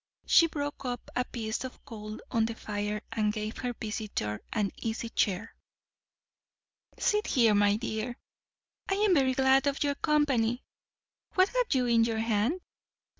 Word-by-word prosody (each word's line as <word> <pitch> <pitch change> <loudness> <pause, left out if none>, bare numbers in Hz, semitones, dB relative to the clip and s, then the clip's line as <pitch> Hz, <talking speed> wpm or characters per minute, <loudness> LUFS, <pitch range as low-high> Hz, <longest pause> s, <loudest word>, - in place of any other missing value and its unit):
She 335 - +6
broke 290 -3 -4
up 245 -2 -5
a 250 - +2
piece 225 0 -3
of 260 - -9
coal 215 -4 -7
on 225 -1 +2
the 230 0 -3
fire, 210 -1 -3
and 210 -1 +1
gave 215 0 -4
her 250 -1 -2
visitor 210 - -3
an 210 -3 0
easy 225 0 -3
chair. 205 -1 0 1.4
"Sit 420 0 +1
there, 230 -4 +5
my 205 0 +4
dear. 225 +1 -3 0.7
I 390 - +2
am 410 -1 +3
very 265 -5 +3
glad 265 +1 +4
of 280 +1 +1
your 285 -1 +1
company. 270 -6 +1 0.7
What 375 +1 +5
have - - +1
you 255 -1 +2
in 230 -1 +4
your 225 -1 0
hand? 225 - +1
235 Hz, 155 wpm, -29 LUFS, 215-275 Hz, 1.4 s, She